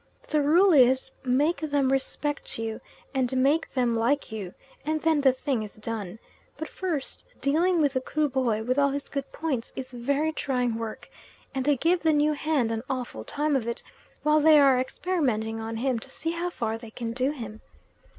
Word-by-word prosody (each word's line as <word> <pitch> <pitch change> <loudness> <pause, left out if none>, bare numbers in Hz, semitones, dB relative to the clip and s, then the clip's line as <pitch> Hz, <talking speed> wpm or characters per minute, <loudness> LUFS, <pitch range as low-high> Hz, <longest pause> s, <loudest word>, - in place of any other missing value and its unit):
The 305 -1 +2
rule 345 +6 +5
is, 260 -1 +4
make 280 +6 +2
them 285 -4 +1
respect 285 +2 -1
you, 225 -1 -4 0.3
and 260 -1 +1
make 285 +5 +2
them 245 -3 +1
like 240 +5 +1
you, 200 -5 -6 0.3
and 310 +1 0
then 320 -2 +3
the 270 -2 +6
thing 260 -2 -2
is 210 -1 -7
done; 215 -3 -5 0.4
but 315 +1 -4
first 330 -8 -3 0.2
dealing 335 +5 +2
with 290 -3 +2
the 260 - 0
Kruboy, 260 -6 0
with 255 +4 +1
all 280 0 +4
his 280 +1 -4
good 275 -1 -4
points, 280 -7 -3
is 260 0 -6
very 280 +6 0
trying 250 -6 -1
work, 225 -1 -5 0.5
and 265 -2 -2
they 290 -1 +3
give 345 +6 +2
the 320 -1 +2
new 300 +1 +3
hand 290 -6 0
an 225 -1 -2
awful 250 - -4
time 295 - 0
of 240 -4 0
it 235 - -3 0.4
while 300 0 +4
they 305 0 +7
are 270 -3 +5
experimenting 255 -7 -1
on 225 0 -4
him 250 0 0
to 270 - -5
see 325 +4 -3
how 340 +1 -2
far 225 -8 -3
they 230 -1 -10
can 230 0 -5
do 255 +2 +1
him. 225 -7 -7
270 Hz, 190 wpm, -27 LUFS, 235-300 Hz, 0.5 s, they